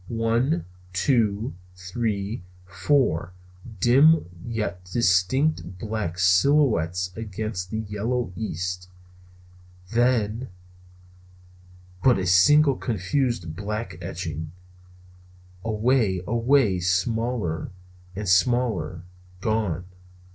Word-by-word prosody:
One, 115 - 0 0.3
two, 110 - +1 0.2
three, 100 +2 -3 0.2
four 95 - +1 0.5
dim 140 - +5 0.2
yet 105 -6 -3
distinct 95 - +1
black 105 -4 -3
silhouettes 90 - +2
against 105 -3 -4
the 110 - -3
yellow 110 +1 -2
east; 90 -3 -4 1.0
then 120 0 +1 1.5
but 130 -2 +5
a 95 - -2
single 135 - +5
confused 110 - -1
black 105 -2 -5
etching; 80 -3 -5 1.1
away, 110 -4 +1
away, 120 -3 +2
smaller 95 0 -1 0.5
and 105 +1 -4
smaller, 95 -4 +1 0.4
gone! 100 -5 -1
105 Hz, 75 wpm, -25 LUFS, 90-120 Hz, 1.5 s, dim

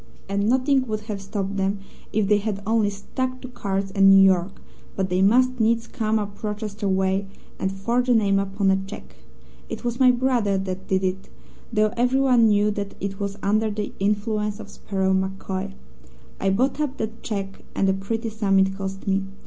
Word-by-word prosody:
"And 200 +2 0
nothing 260 +1 +2
would 215 -1 -2
have 210 -2 -5
stopped 195 0 -3
them 195 +1 0 0.3
if 215 -2 +1
they 205 0 +4
had 200 -1 -3
only 220 -1 +2
stuck 255 +6 -4
to - - -7
cards 195 -5 -3
and 195 0 +5
New 195 0 +8
York, 185 0 +2 0.4
but 190 -1 -1
they 180 +1 +2
must 250 +5 +4
needs 230 +1 +2
come 220 -2 -1
up 205 -1 -5
Rochester 210 -1 -3
way, 190 +1 +1 0.3
and 190 - 0
forge 235 +6 -1
a 245 - +5
name 200 -3 +3
upon 195 0 +1
a 190 0 +1
cheque. 205 - -10 0.5
It - - -6
was 240 +1 -2
my 260 -1 +6
brother 245 -5 +2
that 190 0 -4
did 190 0 +1
it, 190 +1 -2 0.4
though 215 -1 +2
everyone 250 -1 +4
knew 210 0 +3
that 200 -1 -4
it 195 0 -4
was 200 0 -3
under 215 +2 +2
the 210 0 -4
influence 210 +1 0
of 205 -2 -10
Sparrow 190 -1 -1
MacCoy. 190 - -2 0.7
I 195 - +1
bought 255 +9 +1
up 280 -2 -2
that 220 +1 -5
cheque, 195 -3 -4
and 195 - +2
a 190 - +3
pretty 225 +4 -3
sum 205 -3 +1
it 190 0 +3
cost 195 0 -5
me. 195 0 +1
205 Hz, 190 wpm, -24 LUFS, 195-225 Hz, 0.7 s, New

